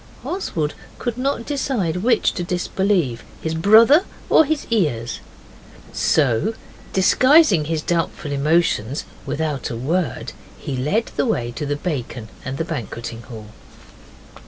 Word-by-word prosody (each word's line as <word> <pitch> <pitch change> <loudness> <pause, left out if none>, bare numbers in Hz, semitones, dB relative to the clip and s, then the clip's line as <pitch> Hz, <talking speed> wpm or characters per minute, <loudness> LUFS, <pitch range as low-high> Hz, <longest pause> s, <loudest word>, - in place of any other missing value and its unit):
Oswald 165 - -2 0.2
could 240 -2 -3
not 255 -2 -1
decide 255 - -1
which 230 +5 +2
to 175 - -3
disbelieve 180 - 0 0.2
his 160 - -3
brother 225 - +6 0.3
or 320 - +7
his 305 0 -1
ears. 120 - 0 0.7
So, 150 - +2 0.4
disguising 215 - +5
his 155 0 -2
doubtful 165 -3 -2
emotions 145 -3 +1 0.2
without 150 -3 -2
a 120 - -4
word, 155 +3 -2 0.2
he 135 - -5
led 150 - 0
the - - +1
way 120 - -1
to 140 +5 -5
the 145 - 0
bacon 130 -8 -4
and 130 +1 -4
the 165 - -2
banqueting 115 - -5
hall. 110 -3 -10
160 Hz, 130 wpm, -21 LUFS, 130-220 Hz, 0.7 s, or